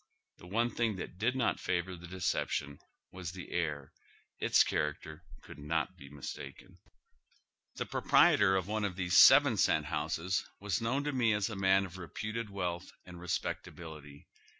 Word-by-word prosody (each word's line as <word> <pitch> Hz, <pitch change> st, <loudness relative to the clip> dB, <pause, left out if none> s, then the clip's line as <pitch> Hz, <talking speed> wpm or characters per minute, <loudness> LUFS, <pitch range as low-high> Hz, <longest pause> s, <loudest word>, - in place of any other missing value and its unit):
The 90 Hz, -, -13 dB
one 115 Hz, +5 st, 0 dB
thing 115 Hz, -2 st, 0 dB
that 90 Hz, 0 st, -8 dB
did 120 Hz, +4 st, +1 dB
not 130 Hz, -3 st, 0 dB
favor 90 Hz, +1 st, -2 dB
the 85 Hz, 0 st, -11 dB
deception 80 Hz, -5 st, -2 dB, 0.3 s
was 90 Hz, -2 st, -6 dB
the 95 Hz, -2 st, -9 dB
air; 75 Hz, -5 st, -2 dB, 0.5 s
its -, -, +5 dB
character 75 Hz, +2 st, -3 dB, 0.2 s
couid -, -, -12 dB
not 75 Hz, 0 st, -2 dB
be 70 Hz, -, -13 dB
mistaken. 70 Hz, -1 st, -9 dB, 1.0 s
Tiie -, -, -3 dB
proprietor 95 Hz, -2 st, +4 dB
of 95 Hz, -2 st, 0 dB
one 110 Hz, 0 st, -1 dB
of 100 Hz, -3 st, -2 dB
these 90 Hz, 0 st, -1 dB
seven 135 Hz, -4 st, +8 dB
cent 75 Hz, -5 st, +2 dB
houses 90 Hz, +5 st, -1 dB, 0.2 s
was 100 Hz, 0 st, -1 dB
known 130 Hz, +5 st, 0 dB
to 150 Hz, -, -1 dB
nie 120 Hz, -5 st, +2 dB
as 105 Hz, +1 st, 0 dB
a -, -, -5 dB
man 95 Hz, 0 st, +3 dB
of 95 Hz, 0 st, -10 dB
reputed 110 Hz, +5 st, -5 dB
wealth 90 Hz, -2 st, -4 dB
and 90 Hz, -1 st, -11 dB
respecta 85 Hz, -1 st, -3 dB
bility. 75 Hz, -4 st, -11 dB
95 Hz, 165 wpm, -32 LUFS, 80-105 Hz, 1.0 s, seven